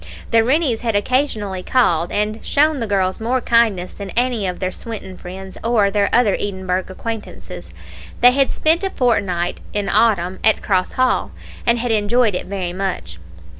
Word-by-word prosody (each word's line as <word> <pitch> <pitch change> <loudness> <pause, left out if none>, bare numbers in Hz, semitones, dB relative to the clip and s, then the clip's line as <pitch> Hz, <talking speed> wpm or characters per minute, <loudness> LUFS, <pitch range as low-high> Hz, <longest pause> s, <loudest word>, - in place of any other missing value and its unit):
The 225 -1 +5
Rennies 260 -2 +1
had 230 -3 -1
occasionally 210 -4 0
called, 175 -8 +1
and 210 +1 -2
shown 300 0 +2
the 230 - -2
girls 190 -2 0
more 240 +4 0
kindness 225 -7 +1
than 200 -1 -7
any 240 -5 +1
of 180 - -3
their 185 -1 -2
Swinton 210 -3 -7
friends, 190 +1 -9
or 220 -4 +2
their 200 0 +1
other 230 -4 +4
Edinburgh 190 -2 -2
acquaintances. 190 - -7 0.5
They 245 +1 +7
had 270 +1 +2
spent 325 +4 +1
a 390 - 0
fortnight, 200 - 0
in 205 -1 -1
autumn, 190 -5 +2
at 220 - +3
Cross 185 -2 0
Hall, 255 0 +1 0.4
and 235 0 +4
had 240 0 -2
enjoyed 220 +1 +2
it 180 - -4
very 185 -3 -3
much. 180 - -4
210 Hz, 170 wpm, -19 LUFS, 185-240 Hz, 0.5 s, They